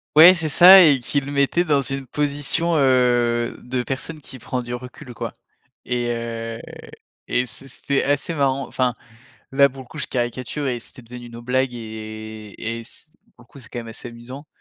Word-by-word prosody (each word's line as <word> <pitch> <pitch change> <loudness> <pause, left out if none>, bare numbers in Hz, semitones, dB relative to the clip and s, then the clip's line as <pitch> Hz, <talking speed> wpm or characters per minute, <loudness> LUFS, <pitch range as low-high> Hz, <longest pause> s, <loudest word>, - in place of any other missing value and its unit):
ouais, 170 +4 +10
c'est 160 -3 -2
ça 185 +4 +9
et 145 -5 +5
qui 140 +4 -1
le 140 +1 -7
mettait 140 +5 +2
dans 145 -5 +2
une 135 +1 -3
position, 145 +5 -1
heu, 120 -3 +2
de 125 0 -2
personne 145 +5 -5
qui 135 -2 -10
prend 125 +1 -4
du 120 0 -5
recul, 125 +2 -10
quoi - - -5 0.5
et 120 -1 -1
heu 115 -1 -5 0.7
et 125 - +1
c'est 135 +4 -11
c'était 140 +1 -1
assez 145 +4 0
marrant. 135 -2 0
Enfin, 125 -1 0 0.6
là, 140 +1 +5
pour 135 0 -10
le 125 - -19
coup, - - -13
je 140 - -2
caricature 125 +3 -3
et 120 -2 -2
c'était 120 - -11
devenu 120 0 -10
nos 115 0 -9
blagues 130 +1 0
et 110 -1 -8
et 115 +1 -3
s 115 - -12 0.2
pour - - -18
le - - -28
coup, - - -13
c'est 120 - -14
quand 120 - -6
même 115 -1 -7
assez 115 +2 -9
amusant 125 +5 -10
125 Hz, 195 wpm, -22 LUFS, 120-140 Hz, 0.7 s, ouais